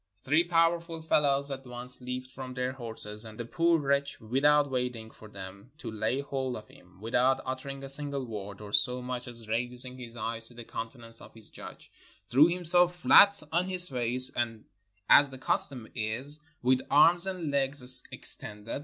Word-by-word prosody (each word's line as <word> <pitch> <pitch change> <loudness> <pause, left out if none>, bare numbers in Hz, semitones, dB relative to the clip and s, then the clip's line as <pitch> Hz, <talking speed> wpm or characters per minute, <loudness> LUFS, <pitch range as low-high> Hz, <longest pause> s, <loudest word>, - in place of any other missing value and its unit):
Three 150 +5 +3
powerful 165 -1 0
fellows 140 -3 +1
at 135 0 -6
once 125 +1 -1
leaped 125 +1 -6
from 130 -1 -9
their 125 0 -2
horses, 110 -4 0
and 110 0 -7
the 120 - -4
poor 165 +7 +1
wretch 140 -1 -1
without 140 +5 +2
waiting 125 -3 -4
for 110 - -15
them 100 +2 -11
to 115 - -8
lay 110 +5 -2
hold 135 -3 -4
of 110 - -10
him, 90 +1 -20
without 125 +5 +1
uttering 135 +1 -6
a - - -6
single 140 -1 +2
word, 105 -3 -8
or 105 -1 -10
so 125 +5 +3
much 125 0 -5
as 115 -2 -6
raising 125 +3 -1
his 120 -1 -10
eyes 115 0 -3
to 120 - 0
the 120 - -9
countenance 115 0 -7
of - - -15
his 110 -2 -14
judge, - - -12 0.3
threw 140 +6 +5
himself 175 0 +4
flat 200 +2 +6
on 175 +3 0
his 180 -1 +3
face, 125 0 +2 0.8
as 140 -1 +6
the 135 - -10
custom 130 -2 -2
is, 125 +6 -5 0.2
with 130 +1 +2
arms 170 +5 +5
and 180 -6 -4
legs 135 -2 +1
extended. 105 +4 -4
130 Hz, 175 wpm, -28 LUFS, 115-145 Hz, 0.8 s, flat